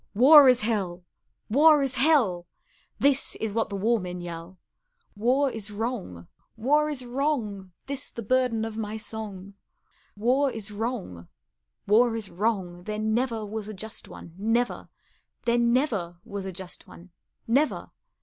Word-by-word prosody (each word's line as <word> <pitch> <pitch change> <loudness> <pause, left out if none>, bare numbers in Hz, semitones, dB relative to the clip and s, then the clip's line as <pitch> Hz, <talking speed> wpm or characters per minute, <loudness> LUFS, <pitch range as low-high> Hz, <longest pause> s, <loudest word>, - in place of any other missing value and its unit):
War 275 +4 +9
is 250 -1 +4
hell, 195 -5 -2 0.4
war 295 +4 +5
is 270 -1 -1
hell! 255 - +2 0.5
This 280 -1 +2
is 220 -2 -3
what 225 0 0
the 200 - -4
war 225 +4 +1
men 180 -1 -6
yell; 170 +1 -8 0.6
War 255 +6 +2
is 220 -3 -6
wrong, 205 - -5 0.3
war 295 +7 +2
is 265 -4 -3
wrong 240 -8 -2
This 280 0 -2
the 230 - -7
burden 245 -1 +1
of 225 0 -6
my 215 0 -4
song; 210 -3 -6 0.6
War 255 +6 +2
is 220 -4 -6
wrong, 205 - -4 0.6
war 225 +3 +4
is 220 -3 -5
wrong, 180 -2 -2
There 215 0 -3
never 220 +1 -1
was 215 0 -5
a 215 - -7
just 220 +3 -2
one, 165 - -11
Never; 230 +4 0 0.6
There 240 0 +2
never 235 - +1
was 200 -1 -5
a - - -4
just 185 0 -6
one, 175 +2 -15 0.3
Never. 275 +7 0
220 Hz, 150 wpm, -26 LUFS, 195-250 Hz, 0.6 s, War